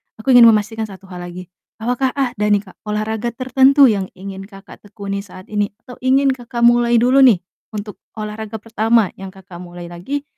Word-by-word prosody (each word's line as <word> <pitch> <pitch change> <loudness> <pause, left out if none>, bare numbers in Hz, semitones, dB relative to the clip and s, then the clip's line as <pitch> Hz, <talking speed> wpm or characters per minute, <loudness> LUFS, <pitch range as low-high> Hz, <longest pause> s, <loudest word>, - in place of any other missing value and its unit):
aku 220 +4 -1
ingin 245 -2 +9
memastikan 220 0 +1
1 195 -1 -14
hal 175 -1 -7
lagi, 180 0 -10 0.2
apakah 250 +3 -1
ada 245 -6 -1
nih 205 -1 +2
Kak, 190 - -18
olahraga 220 +2 -2
tertentu 265 +3 +4
yang 195 -2 -2
ingin 195 +1 -8
Kakak 195 -2 -14
tekuni 200 -1 -6
saat 185 -1 -12
ini 205 -1 0 0.2
atau 250 - -12
ingin 270 +1 +3
Kakak 240 -2 -4
mulai 240 0 +4
dulu 250 +4 +4
nih 240 -10 +5 0.3
untuk 210 -1 -7 0.2
olahraga 215 0 -6
pertama 225 -2 +1
yang 195 - -7
Kakak 190 -2 -13
mulai 175 -1 -10
lagi 270 +12 -5
215 Hz, 180 wpm, -18 LUFS, 195-240 Hz, 0.3 s, ingin